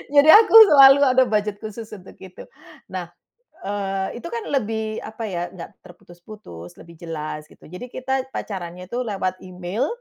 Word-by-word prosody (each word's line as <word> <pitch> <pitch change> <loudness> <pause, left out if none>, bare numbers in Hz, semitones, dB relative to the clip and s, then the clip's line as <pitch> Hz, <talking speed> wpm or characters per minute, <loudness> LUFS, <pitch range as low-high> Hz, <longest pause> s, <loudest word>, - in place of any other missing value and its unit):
Jadi 285 +2 +6
aku 440 +1 +6 0.2
selalu 275 -1 +7
ada 260 -1 +4
budget 210 -1 -2
khusus 220 0 -9
untuk 195 -3 -12
itu. 185 -1 -12 0.4
Nah, - - -7 0.6
eee, 195 +1 -4
itu - - -7
kan 465 -2 -5
lebih, 220 -4 -3
apa 220 +1 -8
ya, 175 -3 -4
nggak 175 -3 -12
terputus-putus, 175 - -14
lebih 170 0 -15
jelas, 155 -2 -7
gitu. - - -18
Jadi 180 +10 -9
kita 265 0 -3
pacarannya 180 -2 -7
tuh 245 +5 -4
lewat 185 -3 -3
email, 185 +8 -4
205 Hz, 155 wpm, -21 LUFS, 180-245 Hz, 0.6 s, selalu